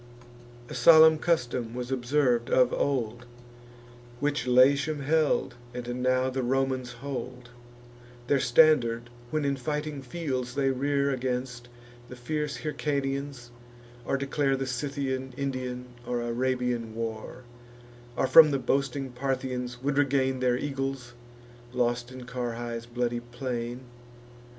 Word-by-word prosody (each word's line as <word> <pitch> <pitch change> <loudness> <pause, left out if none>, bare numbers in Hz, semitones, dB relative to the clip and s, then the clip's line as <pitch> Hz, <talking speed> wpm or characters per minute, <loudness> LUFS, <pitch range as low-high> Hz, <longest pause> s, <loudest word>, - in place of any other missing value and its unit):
A - - -8
solemn 160 +4 +7
custom 125 -8 -1
was 125 +1 -4
observ'd 125 -2 +1
of 125 -1 +4
old, 120 -3 -1 0.9
Which 145 -2 -1
Latium 140 +4 +4
held, 150 -2 +1 0.2
and 125 0 -4
now 130 +1 +2
the 130 0 -2
Romans 130 0 -1
hold, 125 -1 -6 0.8
Their 140 +2 +2
standard 120 -5 +3 0.2
when 155 +1 -1
in 140 0 +1
fighting 150 +2 -3
fields 130 -3 -4
they 135 -1 +2
rear 140 +1 +1
Against 125 -1 -3 0.4
the 125 - -8
fierce 150 +4 -3
Hyrcanians, 140 -4 -3 0.5
or 135 - 0
declare 135 0 0
The 135 - -2
Scythian, 130 0 -3
Indian, 130 -2 -3 0.2
or 125 -1 -1
Arabian 120 -1 -1
war; 115 +2 -5 0.7
Or - - +2
from 155 +4 +8
the 140 - +1
boasting 135 +1 -1
Parthians 125 -1 -3
would 140 0 +1
regain 135 -2 +1
Their 125 -1 +2
eagles, 135 -3 -4 0.6
lost 120 0 0
in 130 -1 -9
Carrhae's 120 -2 -4
bloody 120 0 -1
plain. 120 0 -5
130 Hz, 120 wpm, -28 LUFS, 120-140 Hz, 0.9 s, from